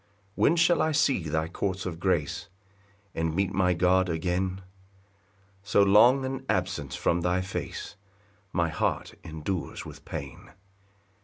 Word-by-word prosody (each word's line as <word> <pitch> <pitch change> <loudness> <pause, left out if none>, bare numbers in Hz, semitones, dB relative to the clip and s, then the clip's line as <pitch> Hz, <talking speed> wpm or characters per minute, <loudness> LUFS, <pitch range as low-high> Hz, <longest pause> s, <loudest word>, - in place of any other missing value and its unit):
2 - - -6
When 165 - +5
shall 170 0 +4
I 160 - +1
see 140 - +2
thy 80 +1 0
courts 95 +2 -3
of 85 -3 -4
grace, 85 -2 -1 0.6
And 80 -1 -1
meet 100 0 0
my 90 -2 +2
God 90 +1 +3
again? 90 +3 -1 1.0
So 100 0 +3
long 120 +7 +6
an 135 0 -4
absence 70 -2 -1
from 85 +1 +1
thy 90 +1 +1
face 95 +1 -5 0.6
My 85 -2 +1
heart - - -1
endures 80 +3 -4
with - - -11
pain. 70 -2 -7
90 Hz, 140 wpm, -27 LUFS, 80-100 Hz, 1.0 s, long